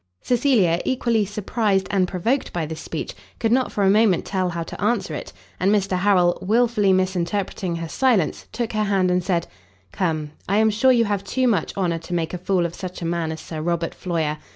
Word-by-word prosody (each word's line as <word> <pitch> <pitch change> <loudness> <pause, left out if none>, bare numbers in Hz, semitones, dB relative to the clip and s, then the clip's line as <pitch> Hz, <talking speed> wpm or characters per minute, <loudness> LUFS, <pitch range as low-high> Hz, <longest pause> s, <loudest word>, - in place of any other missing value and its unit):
Cecilia, 235 - +2
equally 235 -4 +1
surprised 205 -1 0
and 190 -2 +2
provoked 225 +10 -1
by 170 -2 -2
this 155 +1 -6
speech, - - -5 0.2
could 225 - 0
not 255 +1 +2
for 205 - -1
a 190 - +5
moment 210 -3 +3
tell 185 -2 -1
how 170 -1 -3
to 165 - -9
answer 235 +3 0
it; - - -6 0.3
and 190 +2 +2
Mr 195 -2 +1
Harrel, 180 -3 +3
wilfully 215 0 +2
misinterpreting 185 0 -1
her 165 0 -4
silence, 225 - +1
took 235 -2 -3
her 215 0 +1
hand, 190 -3 +2
and 180 0 +1
said, 170 -2 0 0.5
"Come, 155 - -2 0.2
I 200 - +2
am 220 0 +4
sure 235 +5 +4
you 235 -2 +4
have 200 -2 -1
too 255 +6 0
much, 200 -7 0
honour 175 -4 0
to 175 +2 -5
make 165 -1 -2
a 180 - -3
fool 185 -1 +1
of 170 - -3
such 185 -1 -7
a - - -2
man 165 -1 -1
as 160 - -6
Sir 155 -2 -6
Robert 170 0 -1
Floyer. 160 -4 -2
190 Hz, 210 wpm, -22 LUFS, 170-215 Hz, 0.5 s, a